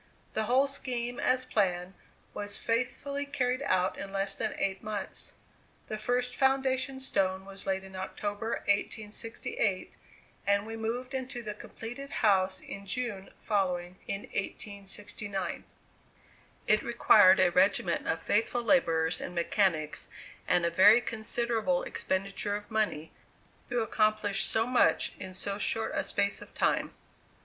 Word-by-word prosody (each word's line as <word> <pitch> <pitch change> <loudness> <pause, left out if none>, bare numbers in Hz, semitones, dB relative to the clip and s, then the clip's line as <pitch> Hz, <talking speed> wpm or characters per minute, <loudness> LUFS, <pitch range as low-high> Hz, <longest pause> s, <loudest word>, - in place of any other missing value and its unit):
The 220 - 0
whole 255 +4 +4
scheme 245 -2 -3
as 255 -1 +2
planned 185 -6 0 0.4
was 205 0 -3
faithfully 255 +5 -1
carried 255 -3 -1
out 185 -8 +1
in 195 0 -6
less 195 0 0
than 220 +1 -2
eight 195 -1 -1
months. 210 -2 -5 0.6
The 215 - -3
first 245 +2 0
foundation 265 0 +1
stone 190 -7 0
was 195 0 -6
laid 190 0 0
in 190 0 -11
October, 205 +4 -3
1868; 210 0 -1 0.5
and 200 0 +3
we 225 +1 -6
moved 240 +4 -3
into 255 -2 -4
the 210 -1 -4
completed 240 +6 -8 0.2
house 190 -2 +3
in 200 0 -8
June 205 -3 -3
following, 185 -3 -1
in 195 - -2
1869. 200 0 -4 1.0
It 215 0 +4
required 210 -5 +6
a 185 -2 +5
regiment 190 -2 +2
of 160 0 -1
faithful 230 +3 +1
laborers 165 - +2
and 180 - -6
mechanics, 170 -3 +1 0.4
and 175 -1 +3
a 170 - +1
very 205 +7 +7
considerable 225 -4 0
expenditure 195 +2 -2
of 205 +2 -7
money, 210 -8 0 0.6
to 245 -1 +1
accomplish 215 -2 +2
so 225 0 +1
much 250 +1 +3
in 190 -1 -6
so 200 +2 -3
short 220 +2 +1
a - - 0
space 200 0 0
of - - -13
time. - - +1
210 Hz, 135 wpm, -30 LUFS, 190-240 Hz, 1.0 s, very